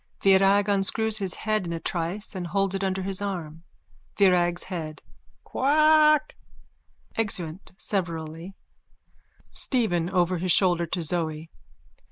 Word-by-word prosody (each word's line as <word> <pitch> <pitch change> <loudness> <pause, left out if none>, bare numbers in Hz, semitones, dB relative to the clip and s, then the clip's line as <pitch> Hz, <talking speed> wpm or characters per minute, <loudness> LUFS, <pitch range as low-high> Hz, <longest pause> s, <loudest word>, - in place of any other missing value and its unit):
(Virag 195 +1 +4
unscrews 210 +2 +2
his 190 -3 0
head 215 -2 -1
in - - -4
a 165 - -3
trice 175 +6 -3
and 180 -3 -5
holds 195 +1 0
it 195 0 -3
under 190 0 -1
his 195 0 -2
arm.) 170 -6 -5 0.6
VIRAG'S 175 -3 +3
HEAD: 160 -5 -7 0.4
Quack! 305 +2 +3 0.8
(Exeunt 185 -6 -3
severally.) 170 -2 -3 1.0
STEPHEN: 180 -10 -1
_(Over 180 -1 +1
his 180 +1 0
shoulder 175 -2 +2
to 175 +1 -2
Zoe.) 160 -1 -3
185 Hz, 120 wpm, -25 LUFS, 170-205 Hz, 1.0 s, Virag